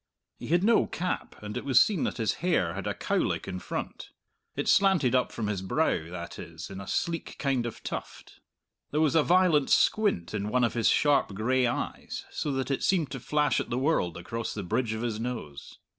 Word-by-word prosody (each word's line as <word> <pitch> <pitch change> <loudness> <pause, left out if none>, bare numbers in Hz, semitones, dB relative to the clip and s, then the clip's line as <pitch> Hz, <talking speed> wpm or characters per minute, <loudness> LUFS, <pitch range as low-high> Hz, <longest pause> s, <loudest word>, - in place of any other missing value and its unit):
He - - -7
had 175 +3 +2
no 230 +2 +4
cap, 180 +2 -3
and 105 0 -6
it - - -3
was 130 -3 +5
seen 195 -2 +3
that - - -3
his 110 -5 +1
hair 160 - +1
had - - -5
a - - -2
"cow - - -1
lick" - - -1
in 90 - -4
front; - - -5 0.5
it - - -2
slanted 190 -11 +4
up 130 -1 +2
from 115 - -4
his 105 -3 -2
brow, 95 - 0
that 85 -1 -7
is, 85 +2 -8
in 95 0 -7
a 100 - -9
sleek 165 -1 -2
kind 130 -4 0
of 115 - -8
tuft. - - -7 0.5
There 150 - -1
was 155 -3 +3
a 160 - +5
violent 170 -4 +3
squint 205 - +2
in 105 -1 -2
one 125 +2 +2
of 115 - +1
his 115 -2 +2
sharp 140 -8 +3
gray 125 +4 +2
eyes, 120 - -4
so 145 - -2
that 135 0 -2
it 135 - -1
seemed 175 -6 +1
to 135 - -4
flash 150 +2 +1
at - - -4
the 120 - -1
world 130 - +1
across 115 +7 -4
the 100 - -4
bridge 110 +5 -1
of 110 +1 -4
his 115 -3 -2
nose. 115 - -6
125 Hz, 220 wpm, -28 LUFS, 105-150 Hz, 0.5 s, was